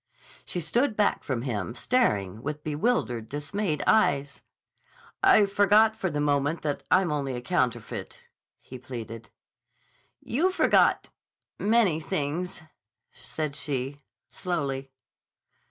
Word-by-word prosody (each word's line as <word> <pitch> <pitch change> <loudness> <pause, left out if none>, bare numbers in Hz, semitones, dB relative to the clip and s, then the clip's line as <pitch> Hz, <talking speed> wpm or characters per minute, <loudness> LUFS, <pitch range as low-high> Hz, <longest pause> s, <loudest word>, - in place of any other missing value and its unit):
She 180 - -3
stood 225 - +1
back 210 - +2
from 125 -4 -2
him, 115 -3 -3
staring 105 - +1
with 150 +2 -5
bewildered, 150 - -1
dismayed 150 +3 -2
eyes. 140 -9 +2 0.8
"I 210 - +6
forgot 205 +2 +4
for 190 -4 -2
the 150 - -3
moment 145 +2 0
that 145 -2 -2
I'm 185 -3 +3
only 140 -3 -2
a 120 - -5
counterfeit," 120 -5 -2 0.4
he 130 - -11
pleaded. 115 -3 -8 0.9
"You 315 +11 +1
forgot—many 215 - +1
things," 165 +1 -3 0.5
said 155 -3 -4
she 135 -1 -3 0.3
slowly. 140 -7 -3
150 Hz, 105 wpm, -27 LUFS, 135-195 Hz, 0.9 s, I